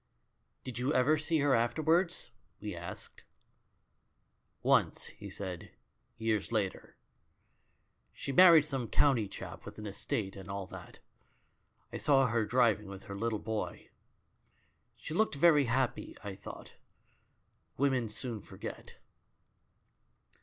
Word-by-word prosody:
" - - -47
"Did 125 -2 -6
you 130 +3 0
ever 130 +5 +4
see 160 +1 +1
her 140 -1 +3
afterwards?" 160 +10 +2 0.3
we 105 -3 -5
asked. 85 +2 -8 1.4
"Once," - - +3
he - - -8
said, 95 -3 -6 0.5
"years 110 -2 -1
later. 105 -5 -2 1.1
She - - -5
married 165 0 +8
some 135 -6 -3
County 125 -4 +3
chap, 100 - -8
with - - -10
an 105 - -7
estate 100 0 -3
and 95 0 -10
all 100 0 -4
that. - - -11 1.0
I - - -2
saw 135 -2 +4
her 115 -2 +1
driving 110 -3 +3
with 95 0 -9
her 100 - -7
little 110 +2 -1
boy. 110 0 -4 1.1
She 155 - -7
looked 215 -1 +2
very 150 -1 +5
happy 125 +1 -1
I 100 -1 -5
thought. 100 - -10 1.0
Women 130 -4 +1
soon 115 0 -4
forget." - - -9
115 Hz, 125 wpm, -32 LUFS, 105-140 Hz, 1.4 s, married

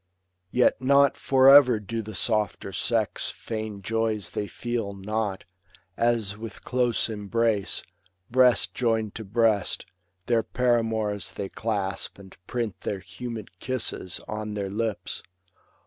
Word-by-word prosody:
Yet 125 +3 +3
not 140 +1 +5
for 130 -1 +4
ever 135 -5 +8
do 115 +2 -4
the 110 -1 -8
softer 105 0 0
sex 110 +3 0
Feign 110 -3 -5
joys 110 -3 -1
they 105 - -2
feel 115 -2 -3
not, 100 -1 -3 0.5
as 115 -4 +1
with 110 -2 -9
close 125 -2 +1
embrace. 110 -1 0 0.5
Breast 125 -1 +4
join'd 110 -3 0
to 110 - -6
breast, 110 -1 +1 0.4
their 115 0 +3
paramours 115 -4 0
they 100 -1 -4
clasp, 100 -3 -2
And 95 -1 -13
print 115 -5 -3
their 100 - -2
humid 105 -1 -8
kisses 120 -8 -3
on 105 0 -4
their 100 -2 -3
lips. 110 0 -2
110 Hz, 125 wpm, -26 LUFS, 100-120 Hz, 0.5 s, ever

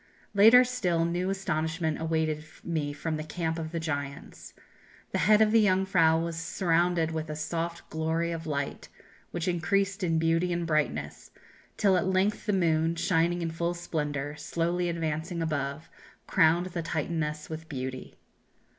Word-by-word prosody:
"Later 225 +5 +8
still, 180 -10 0
new 175 +2 -1
astonishment 160 -4 -1
awaited 160 -1 0 0.2
me 155 -4 -2
from 155 +2 -3
the 155 - -4
camp 160 +1 -3
of 160 -1 -5
the 170 - -2
giants. 145 -3 -5 0.6
The - - 0
head 215 0 +7
of 215 - +2
the 225 -1 +5
Jungfrau 185 -4 +3
was 165 0 -2
surrounded 170 -1 +1
with 160 -1 -4
a 155 - -3
soft 165 +2 -4
glory 160 +2 -1
of 165 -1 -5
light, 140 -2 -3 0.4
which 170 0 -4
increased 195 +4 0
in 165 -2 +1
beauty 165 +2 +2
and 170 0 -1
brightness, 75 - -1 0.5
till 195 -3 +4
at 180 - 0
length 190 +4 +1
the - - +3
moon, 165 -3 +2
shining 175 0 +1
in 165 - -2
full 170 +2 -2
splendour, 150 -4 -3
slowly 175 +2 -1
advancing 165 +1 -2
above, 150 -2 -2 0.4
crowned 170 0 +3
the 170 - -3
Titaness 155 -1 -2
with 160 0 -7
beauty." 130 -2 -5
165 Hz, 155 wpm, -28 LUFS, 155-175 Hz, 0.6 s, Later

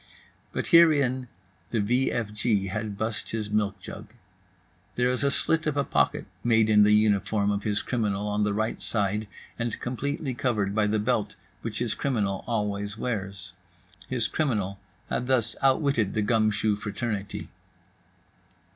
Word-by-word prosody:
But - - -3
herein 140 -7 +5 0.4
the 115 - 0
v 125 +6 +2
f 110 -3 -2
g 105 -2 +1
had 105 0 -4
bust 110 +1 -3
his 110 -2 -3
milk 105 -2 0
jug. 95 - -9 0.9
There 125 0 +2
is 125 - -1
a 140 - +4
slit 160 +3 +2
of 145 -1 0
a 140 - +3
pocket - - +1 0.2
made 110 -2 +3
in 105 -1 +6
the 105 0 +6
uniform 105 -1 +2
of 100 0 -1
his 105 0 -1
criminal 105 -4 -1
on 105 0 0
the 105 - +1
right 110 +2 -1
side, 105 0 0 0.3
and 115 0 -2
completely 135 +3 -3
covered 115 -7 0
by 105 0 +2
the 110 +1 +1
belt 105 -1 0 0.3
which 115 -2 -4
his 120 -2 0
criminal 105 -8 -1
always 105 -2 -2
wears. 100 -5 -4 0.6
His 120 -3 0
criminal 105 -10 -1 0.3
had 125 - -1
thus 120 -3 +2
outwitted 135 -6 +2
the 110 - +1
gumshoe 110 -1 +2
fraternity. 105 0 -4
110 Hz, 155 wpm, -27 LUFS, 105-125 Hz, 0.9 s, in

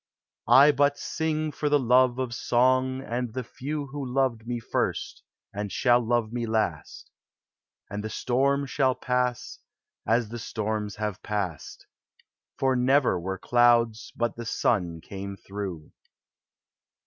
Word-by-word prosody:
I 140 +3 +8
but 145 0 +2
sing 155 -1 -2
for 150 0 -2
the 145 - +5
love 125 -1 +3
of 130 -2 -2
song 130 +2 +2
and 120 -1 -3
the 130 0 -3
few 145 +5 -5
Who 145 0 -5
loved 125 -3 -1
me 120 -1 -2
first 115 - -2 0.3
and 105 0 -4
shall 120 +4 +3
love 115 -1 0
me 120 -1 -2
last; 110 -9 -2 0.8
And 105 +1 -5
the 110 - -4
storm 140 +5 +1
shall 130 -1 +1
pass 125 -1 -2 0.5
as 115 -1 +2
the 120 +1 -6
storms 110 -2 -3
have 105 -2 -4
passed, 95 -8 -4 0.7
For 135 -1 +2
never 130 -5 +3
were 95 +2 -4
clouds 120 0 +3
but 120 0 -1
the 120 - -7
sun 90 -9 0
came 100 +2 -7
through. 95 -6 -7
120 Hz, 135 wpm, -26 LUFS, 105-130 Hz, 0.8 s, I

